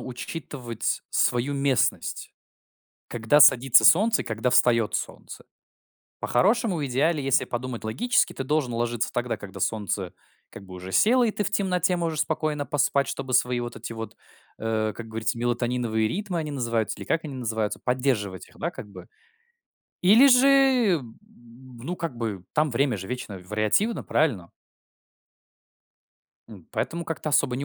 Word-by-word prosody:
учитывать 125 -2 -5
свою 125 +3 +1
местность. 140 -2 -1 0.8
Когда 120 +6 +2
садится 130 -2 +7
солнце 215 +7 +5
и - - -17
когда 110 +3 -2
встаёт 115 -3 +3
солнце. - - -6 0.8
По-хорошему, 210 - +1
в 145 - -2
идеале, 145 +4 +1
если 135 0 +2
подумать 125 -1 -5
логически, 240 - +1
ты - - -5
должен 145 -3 0
ложиться 120 0 -2
тогда, 120 -1 -2
когда 100 -1 -10
солнце, 100 -3 -2 0.4
как - - -11
бы, 95 -1 -12
уже 90 +1 -8
село, 245 - +4
и 230 - +1
ты 210 - -3
в - - -2
темноте 180 -2 +1
можешь 165 -3 -2
спокойно 155 -1 -1
поспать, 140 0 +1
чтобы 130 -2 -4
свои 125 0 +2
вот 120 0 -6
эти - - -7
вот, 115 0 -7 0.4
э, 110 -1 -1
как 115 - -8
говорится, 110 +2 -2
мелатониновые 120 -2 -1
ритмы 190 - -3
они 155 -2 -3
называются 115 -4 -1
или - - -7
как 165 - -1
они 145 -3 -6
называются, 110 -4 -2
поддерживать 125 -7 -1
их, - - -21
да, - - -2
как 105 - -10
бы. - - -12 0.9
Или 225 +9 +7
же, 255 +1 +6 0.5
м, 115 -3 -13 0.7
ну, 175 +8 -4
как 165 -8 -5
бы, 105 -6 -4
там, 150 0 +1
время 125 -1 +1
же 95 -1 -7
вечно 125 -6 -6
вариативно, 110 - 0
правильно? 110 - 0 2.0
М, 100 -7 -13
поэтому 170 +1 -3
как-то 160 -2 -4
особо 125 -2 +2
не 140 - -3
125 Hz, 155 wpm, -25 LUFS, 110-155 Hz, 2.0 s, садится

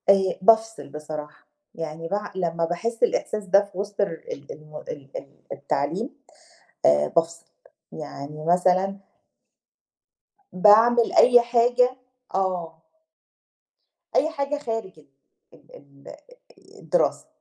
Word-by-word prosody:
آآ 195 -1 +4
بافصل 225 0 +3
بصراحة، 150 0 -8 0.3
يعني 165 0 -6
بع 205 +3 -3
لمّا 170 -2 -1
باحس 225 +8 -3
الإحساس 215 -3 0
ده 195 +2 +4
في 200 -2 -16
وسط 205 +1 -3
الر 165 -5 -2
ال 140 - -9
ال 155 0 -10 0.4
ال - - -9 0.2
التعليم، - - -2 0.8
آآ 75 0 +4
بافصل، 165 0 0 0.5
يعني 150 0 -8
مثلًا 185 +3 +2 1.6
باعمل 225 +5 +5
أي 245 -1 +7
حاجة 245 +1 +2 0.4
آه. 180 -4 -2 1.3
أي 315 - +3
حاجة 285 -2 -3
خارج 225 - -5
ال 150 - -22 0.7
ال 140 0 -15 0.6
الدراسة، - - 0
190 Hz, 105 wpm, -24 LUFS, 160-225 Hz, 1.6 s, أي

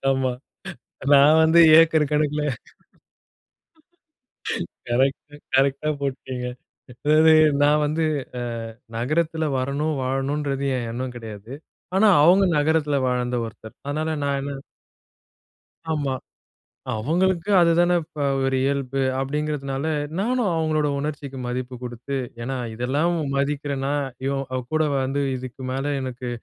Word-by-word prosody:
ஆமா. 130 -1 0 0.8
நான் 145 +3 +7
வந்து 160 +1 +6 0.2
ஏக்கர் 160 -3 +4
கணக்குல 150 0 +1 2.5
கரெக்ட். 135 +4 0 0.2
கரெக்டா 140 +3 +2
போட்டுடீங்க. 130 -2 -4 0.5
அதாவது 155 +5 +4 0.3
நான் 150 +1 +4
வந்து 155 +2 0 0.4
அ - - -3 0.6
நகரத்துல 160 +6 0
வரணும், 140 +4 -1
வாழணும்ன்றது 135 +1 -1
என் 120 - -3
எண்ணம் 125 +1 -5
கிடையாது. 110 -1 -9 0.4
ஆனா 205 +3 +5 0.2
அவங்க 185 +5 +6
நகரத்துல 150 -1 +2
வாழ்ந்த 125 0 -1
ஒருத்தர். 110 0 -12
அதனால 155 +2 -1
நான் 140 -1 0
என்ன 140 +1 -4 1.4
ஆமா. 145 -4 -1 0.9
அவங்களுக்கு 175 - 0
அதுதானே 175 +1 +4 0.5
ஒரு 135 - +1
இயல்பு 135 -1 -1 0.2
அப்படிங்கிறதுனால, 140 0 -2 0.3
நானும் 235 -1 +1
அவங்களோட 155 -2 +1
உணர்ச்சிக்கு 145 -2 -5
மதிப்பு 125 +1 -4
குடுத்து. 125 +3 -5 0.2
ஏன்னா 130 +3 -3 0.2
இதெல்லாம் 140 +9 0 0.2
மதிக்கலனா 140 0 -1 0.3
இவன் 135 -2 -2
கூட 155 0 +3 0.2
வந்து 135 +2 -1
இதுக்கு 130 +1 -8
மேல 135 +2 -1
எனக்கு 125 -1 -5
140 Hz, 105 wpm, -23 LUFS, 130-155 Hz, 2.5 s, நான்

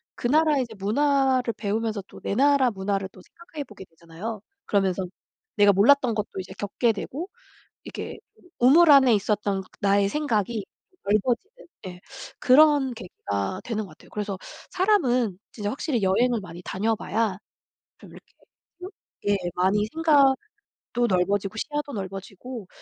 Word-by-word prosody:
그 - - -2
나라의 300 0 +3
이제 230 -2 -9
문화를 260 +3 +1
배우면서 215 0 -2
또 - - -13
내 - - -2
나라 275 0 +4
문화를 195 -1 -2
또 185 - -16
생각해 315 - -9
보게 210 -7 -13
되잖아요. 170 +6 -8 0.2
그러면서 190 -2 0 0.5
내가 205 -1 +6
몰랐던 240 +3 +4
것도 210 -2 -4
이제 185 0 -7
겪게 205 +3 0
되고 295 - -6 0.5
이렇게 - - -7 0.4
우물 305 +7 +6
안에 265 -4 +7
있었던 205 -1 0 0.2
나의 200 0 +3
생각이 225 -7 -1 0.4
넓어지는 245 - -1 0.2
예. 180 0 -10 0.4
그런 280 -1 +5
계기가 175 - -4
되는 220 -2 -3
것 - - -14
같아요. 155 - -18
그래서 205 -2 -4 0.3
사람은 255 - +2
진짜 205 -2 -4
확실히 265 -1 -2
여행을 235 +5 +2
많이 175 -2 -10
다녀봐야 215 0 -1 0.6
좀 - - -15
이렇게 - - -16
또 - - -27 0.8
예 205 -1 +3 0.2
많이 195 +3 +2
생각도 310 +3 +3 0.5
넓어지고 195 +2 0
시야도 295 +4 -4
넓어지고 195 +3 -7
220 Hz, 315 characters per minute, -25 LUFS, 195-270 Hz, 0.8 s, 안에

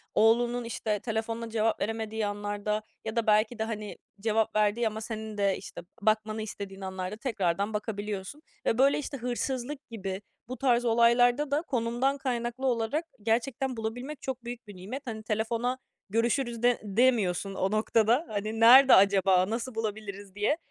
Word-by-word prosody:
oğlunun, 240 +2 +3
işte, 215 -2 -2
telefonuna 225 +1 -3
cevap 220 0 0
veremediği 220 0 -2
anlarda 205 +1 -2 0.2
ya 220 +1 -4
da 230 -1 0
belki 215 +2 +3
de - - +1
hani 215 -2 -5 0.2
cevap 220 0 0
verdiği 215 +2 +2
ama 220 0 -4
senin 220 -1 -6
de, 200 -1 +2
işte, 195 - -9 0.2
bakmanı 215 +1 +1
istediğin 200 -2 -7
anlarda 190 +1 -4
tekrardan 200 -4 -1
bakabiliyorsun 210 +4 -4 0.2
ve, 225 - +2
böyle, 275 +2 +4
işte, 280 -1 -5
hırsızlık 255 +3 -3
gibi 195 -3 -5 0.3
bu 255 0 -6
tarz 245 -1 +2
olaylarda 240 +4 +4
da 290 - +2
konumdan 255 -1 0
kaynaklı 245 -1 -3
olarak 245 +7 0 0.2
gerçekten 245 +3 0
bulabilmek 245 +6 -5
çok 260 -2 -5
büyük 240 -2 -7
bir 205 - -10
nimet. 210 +10 -6
Hani 220 -1 -5
telefona 230 +4 -1 0.3
görüşürüz 235 +2 0
de 245 -1 +4
demiyorsun 205 -3 +2
o 190 +1 0
noktada. 225 +6 +2
Hani 215 +2 -3
nerede 260 +4 +9
acaba, 190 -1 +4
nasıl 230 +1 -3
bulabiliriz 205 -3 -5
diye 215 +10 +1
225 Hz, 155 wpm, -28 LUFS, 210-245 Hz, 0.3 s, nerede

